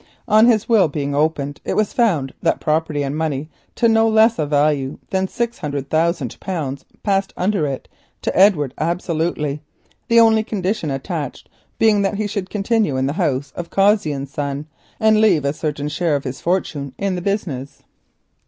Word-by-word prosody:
On 215 +1 +6
his 220 -3 +3
will 220 -7 +5
being 145 -1 -3
opened, 145 -1 -1
it - - -2
was 215 -1 +1
found 165 - +1
that - - +1
property 155 -1 0
and 140 +1 -3
money 155 -1 -2 0.2
to 235 - +3
no 225 0 +4
less 220 -1 +4
a 150 - 0
value 145 -2 +1
than 190 0 +1
600,000 160 - -2
pounds 145 -7 -4 0.2
passed 195 -1 +1
under 185 -4 +1
it 135 -2 -5 0.4
to - - -1
Edward 165 -9 +4
absolutely, 160 -3 -1 0.5
the 230 -1 +5
only 225 -1 +5
condition 195 -5 -2
attached 140 +1 -4 0.3
being 215 -2 +4
that 200 +1 0
he 215 +1 -1
should 200 -2 -3
continue 210 - 0
in 130 - +1
the 140 - -1
house 140 -2 -1
of 170 -1 -6
Cossey 195 -4 +3
and 140 -1 -4
Son 140 +1 -4 0.3
and 220 0 +4
leave 180 -10 +3
a 140 - +1
certain 150 -2 -3
share 150 +1 0
of 140 - -2
his 130 0 -6
fortune 155 -6 -2
in 195 -1 -1
the 180 - -3
business. 165 -9 -3
165 Hz, 170 wpm, -20 LUFS, 145-205 Hz, 0.5 s, On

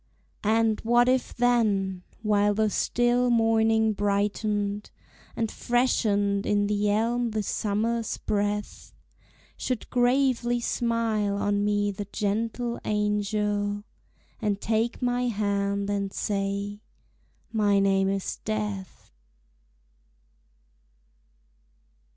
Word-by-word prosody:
And 220 0 +2
what 240 +2 +3
if 255 0 +1
then, 210 -6 +1 0.2
while 205 -1 +2
the 215 0 +1
still 240 +3 +2
morning 225 -1 +3
brightened, 205 0 -1 0.5
And 225 -2 -1
freshened 205 -5 +1
in 205 -1 +1
the 205 0 +1
elm 230 +3 +1
the 215 -1 -2
summer's 220 +3 -1
breath, 205 0 -3 0.6
Should 255 -3 -3
gravely 245 -1 +2
smile 230 -4 0
on 205 0 0
me 205 0 +1
the 200 +1 -6
gentle 230 +3 -2
angel, 210 0 -1 0.6
And 205 -2 0
take 225 +4 -1
my 245 0 +1
hand 200 -2 -1
and 200 -1 -1
say, 200 0 -2 0.7
"My 205 -3 +2
name 195 -1 +3
is 195 -1 -2
Death"? 210 -3 -4
210 Hz, 95 wpm, -26 LUFS, 205-230 Hz, 0.7 s, what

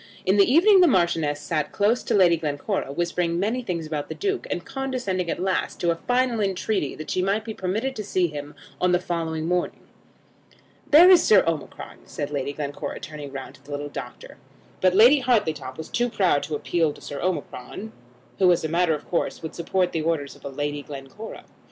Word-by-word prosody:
In 190 +2 +3
the 200 +4 +5
evening 375 +6 +6
the 355 - +7
Marchioness 170 - +1
sat 150 -3 -2
close 215 +4 +2
to - - -1
Lady 180 -4 +5
Glencora, 155 +2 -3
whispering 170 +2 -1
many 220 +6 0
things 175 -8 -3
about 155 -2 -4
the - - -5
Duke; 395 -1 -2
and 175 - -3
condescending 255 -10 -3
at - - -2
last 190 +1 -1
to 170 -1 +2
a - - 0
final 245 +4 0
entreaty 195 -5 -1
that 155 - -7
she 185 - +1
might 200 +4 0
be 220 - -5
permitted 215 +8 -2
to 215 - -3
see 185 -2 +1
him 145 -2 -6 0.3
on 180 0 +3
the 180 - +4
following 160 -3 -3
morning. 180 +1 -1 1.1
"There 320 +5 +9
is 370 -2 +8
Sir 205 -3 +5
Omicron," 165 -3 -4
said 145 0 -5
Lady 140 -1 -2
Glencora, 145 0 -5
turning 150 -2 -8
round 135 -1 -7
to 135 - -20
the 140 - -18
little 145 0 -4
doctor. - - -9 0.4
But 185 0 +3
Lady 245 +8 +7
Hartletop 160 - 0
was 160 - -6
too 240 +1 0
proud 190 -10 +2
to 155 - -3
appeal 160 0 0
to - - -15
Sir 145 - -6
Omicron, 180 - -4 0.5
who, 185 -2 +6
as 170 - +1
a - - 0
matter 170 0 +2
of 150 - -10
course, 170 - -2
would 160 - -5
support 180 +2 0
the 160 - -1
orders 155 -3 -2
of - - -19
Lady 145 +1 -3
Glencora. 140 +10 -9
175 Hz, 200 wpm, -24 LUFS, 150-210 Hz, 1.1 s, There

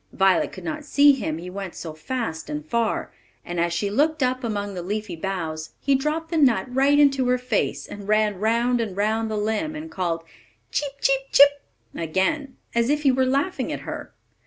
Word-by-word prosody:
Violet 190 -2 +3
could - - -10
not 310 -2 -4
see 290 0 +6
him, 160 - -2
he 180 +2 -7
went 195 -1 -6
so 160 -2 -6
fast 160 -1 -4
and 150 0 -4
far; 230 +7 -1 0.3
and 175 0 -4
as 170 0 +1
she 200 +4 -1
looked 300 +5 +2
up 255 +1 0
among 205 -3 -2
the 180 - -4
leafy 205 0 -3
boughs, 160 -3 -4
he 280 - +1
dropped 305 +4 -1
the 330 - 0
nut 240 -10 +4
right 275 +2 +4
into 275 -3 +4
her 250 0 +3
face, 250 -4 -1
and 205 -1 -9
ran 210 -2 +2
round 235 +3 +2
and 200 -4 -4
round 220 +2 +1
the 215 - -2
limb, 220 +9 -1
and 315 +1 -7
called 170 -3 -2 0.5
"Cheep, 285 -2 -1
cheep, 270 0 +3
chip!" 285 0 +6 0.3
again, 190 - -1 0.2
as 235 +1 +2
if 300 +1 +1
he 275 - +5
were 260 0 +2
laughing 280 +8 0
at - - -4
her. - - -7
230 Hz, 200 wpm, -24 LUFS, 190-275 Hz, 0.5 s, see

